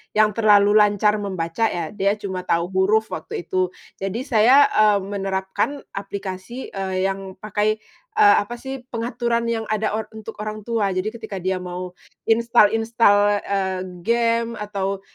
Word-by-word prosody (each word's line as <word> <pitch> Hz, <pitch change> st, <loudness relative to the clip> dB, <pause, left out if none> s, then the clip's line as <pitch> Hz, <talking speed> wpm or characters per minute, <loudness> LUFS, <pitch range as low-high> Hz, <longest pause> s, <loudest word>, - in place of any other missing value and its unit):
yang 215 Hz, 0 st, +4 dB
terlalu 205 Hz, -1 st, +4 dB
lancar 210 Hz, 0 st, +3 dB
membaca 190 Hz, +1 st, -1 dB
ya, 170 Hz, -6 st, -4 dB
dia 200 Hz, 0 st, +1 dB
cuma 190 Hz, -3 st, -6 dB
tahu 170 Hz, +2 st, 0 dB
huruf 205 Hz, +4 st, +2 dB
waktu 160 Hz, +2 st, -5 dB
itu. 185 Hz, +2 st, 0 dB, 0.3 s
Jadi 195 Hz, +6 st, -3 dB
saya, 255 Hz, +2 st, +5 dB
eee, 210 Hz, -1 st, +4 dB
menerapkan 195 Hz, +7 st, -2 dB
aplikasi, 195 Hz, +4 st, -6 dB
eee, 190 Hz, -1 st, -2 dB
yang 195 Hz, -1 st, -3 dB
pakai, 215 Hz, +1 st, 0 dB, 0.4 s
eee, 420 Hz, -1 st, +7 dB
apa 240 Hz, +3 st, -7 dB
sih 265 Hz, +2 st, -6 dB
pengaturan 235 Hz, 0 st, -1 dB
yang 225 Hz, -1 st, -3 dB
ada 215 Hz, 0 st, 0 dB
or 215 Hz, 0 st, -3 dB
untuk 220 Hz, 0 st, -9 dB
orang 215 Hz, 0 st, -5 dB
tua. 210 Hz, -4 st, 0 dB
Jadi 190 Hz, +4 st, -1 dB
ketika 220 Hz, -3 st, -8 dB
dia 185 Hz, 0 st, -1 dB
mau 180 Hz, 0 st, -6 dB, 0.4 s
install-install, 225 Hz, -2 st, +4 dB, 0.2 s
eee, 190 Hz, -2 st, -1 dB, 0.2 s
game 230 Hz, 0 st, +1 dB
atau 195 Hz, -2 st, -3 dB
210 Hz, 145 wpm, -22 LUFS, 190-225 Hz, 0.4 s, eee